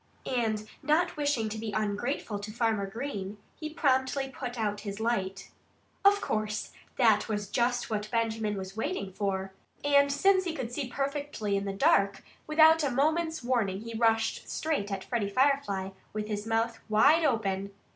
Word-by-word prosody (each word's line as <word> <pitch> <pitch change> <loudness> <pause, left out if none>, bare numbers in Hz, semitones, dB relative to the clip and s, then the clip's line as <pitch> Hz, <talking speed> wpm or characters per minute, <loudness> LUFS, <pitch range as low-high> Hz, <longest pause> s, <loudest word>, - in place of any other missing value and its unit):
And 220 -4 -1
not 335 +4 +2
wishing 285 -7 0
to 220 +1 -5
be 215 -1 -4
ungrateful 210 +1 -2
to 205 +1 -6
Farmer 220 -3 0
Green, 210 -3 -5 0.2
he 310 - -6
promptly 270 -2 +1
put 250 -2 -6
out 210 -2 -1
his 205 0 -6
light. 195 -4 -2 0.5
Of 405 +1 +5
course, 215 0 -2 0.3
that 220 -4 +4
was 205 -2 -2
just 240 +2 0
what 210 0 -2
Benjamin 225 -2 -1
was 190 0 -6
waiting 220 - -3
for. 195 -1 -2 0.3
And 280 0 +4
since 375 +6 +3
he 335 -2 -2
could 240 -6 -4
see 270 +1 -3
perfectly 275 -5 -2
in 200 0 -1
the 195 - -2
dark, 195 0 +3 0.2
without 315 +1 +6
a 285 - +2
moment's 315 +4 +1
warning 220 -6 0
he 230 +1 -7
rushed 225 0 +1
straight 290 -11 -1
at 195 -1 -3
Freddie 230 -5 -1
Firefly, 255 -6 +1 0.2
with 215 0 -3
his 210 0 -3
mouth 225 0 0
wide 285 +10 +5
open. 200 -8 0
225 Hz, 165 wpm, -29 LUFS, 205-280 Hz, 0.5 s, without